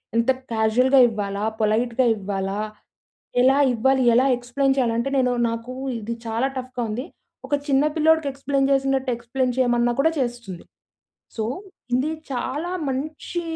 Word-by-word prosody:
ఎంత 230 +3 +3 0.2
క్యాజువల్‌గా 235 +5 +3
ఇవ్వాలా, 205 -2 -3 0.2
పొలైట్‌గా 230 +4 +1
ఇవ్వాలా, 195 -1 -3 0.8
ఎలా 265 +2 +5 0.2
ఇవ్వాలి, 265 +3 +2
ఎలా 255 +2 +4
ఎక్స్‌ప్లయిన్ 270 +3 0
చేయాలి, 240 -3 +2
అంటే 235 +4 -1
నేను 250 -1 +2 0.2
నాకు 230 +2 -5 0.3
ఇది 230 +2 -4
చాలా 225 +4 0
టఫ్‍గా 255 -1 -4
ఉంది. 240 +5 -3 0.4
ఒక 290 - +2
చిన్న 275 0 +3
పిల్లోడికి 320 -1 +3
ఎక్స్‌ప్లయిన్ 275 0 0
చేసినట్టు 270 -1 +1
ఎక్స్‌ప్లెయిన్ 245 +1 -2
చేయమన్నా 240 -1 +2
కూడా 320 +4 +4
చేస్తుంది. 240 -8 -4 0.7
సో, 220 - -1 0.5
ఇది 275 +5 0 0.2
చాలా 280 +7 -3 0.2
మంచి 305 +6 -4
250 Hz, 135 wpm, -23 LUFS, 230-270 Hz, 0.8 s, ఎలా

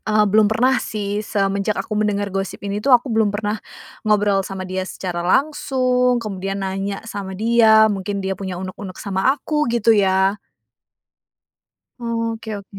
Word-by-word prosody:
eee, 215 0 +4
belum 210 +1 +4
pernah 250 +4 +3
sih 205 -1 -3
semenjak 200 0 -1
aku 215 - -3
mendengar 205 -1 0
gosip 195 -1 -3
ini 200 +1 -2
tuh 275 - +1
aku 245 +1 -8
belum 220 -2 +3
pernah 210 +1 -2 0.5
ngobrol 205 -2 +3
sama 190 0 -6
dia 185 0 -3
secara 175 -3 -4
langsung, 250 - +1
kemudian 195 -1 -4
nanya 195 +1 -3
sama 200 -3 -6
dia 220 -1 +5
mungkin 200 +1 -3
dia 190 0 -1
punya 190 -2 -5
uneg-uneg 185 0 -7
sama 200 +7 +1
aku 300 +2 -1
gitu 230 -1 +3
ya. 190 0 +3 1.6
Oke 230 -2 -3
oke. 200 0 -12
205 Hz, 150 wpm, -20 LUFS, 195-225 Hz, 1.6 s, dia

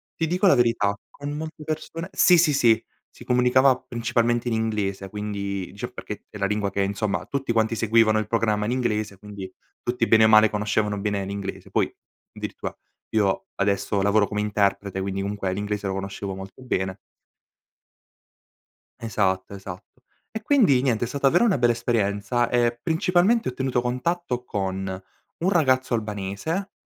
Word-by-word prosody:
ti 165 - -1
dico 180 +5 +1
la 185 - +7
verità: 115 -4 +2 0.2
con 145 0 -7
molte 155 +1 -6
persone 155 +3 -5
sì, 180 -1 +5
sì, 165 -2 +4
sì, 115 -4 +4 0.3
si - - -14
comunicava 125 +1 +4
principalmente 120 -1 0
in 115 - 0
inglese; 105 -3 -2
quindi 100 -2 -4
dicevo 100 - -7
perché - - -7
è - - -9
la 100 - 0
lingua 105 0 0
che 100 0 -1
insomma 100 +1 -1
tutti 135 -4 -2
quanti 110 0 +1
seguivano 110 -1 +3
il 110 - -3
programma 110 -2 +1
in 110 - -1
inglese 105 -5 -1
quindi 100 -2 -8 0.3
tutti 120 -1 0
bene 110 -1 +6
o - - +6
male 110 0 +7
conoscevano 105 0 0
bene 100 -1 -1
l'inglese. 100 0 -6
Poi - - +1 0.5
addirittura - - -6 0.4
io 100 -3 +2
adesso 100 0 0
lavoro 100 +1 +3
come 105 0 -2
interprete 100 -2 0
quindi 95 0 -2
comunque 100 -1 -2
l'inglese 105 0 -3
lo 95 - -1
conoscevo 95 0 -5
molto 95 +6 -10
bene. 95 -6 -2 2.0
Esatto, 95 -4 -1
esatto. 95 +5 -10 0.3
E 220 - -5
quindi 215 - +4
niente 120 -3 +1
è - - -6
stata 140 +3 +1
davvero 175 - +4
una 205 -9 +3
bella 120 -1 +3
esperienza 115 0 0
e 120 -1 +1
principalmente 180 - +2
ho - - -7
tenuto 130 -1 0
contatto 125 +1 -2
con 95 -3 -3 0.5
un 180 +3 +1
ragazzo 130 -8 +2
albanese, 110 - -3
110 Hz, 160 wpm, -24 LUFS, 100-130 Hz, 2.0 s, la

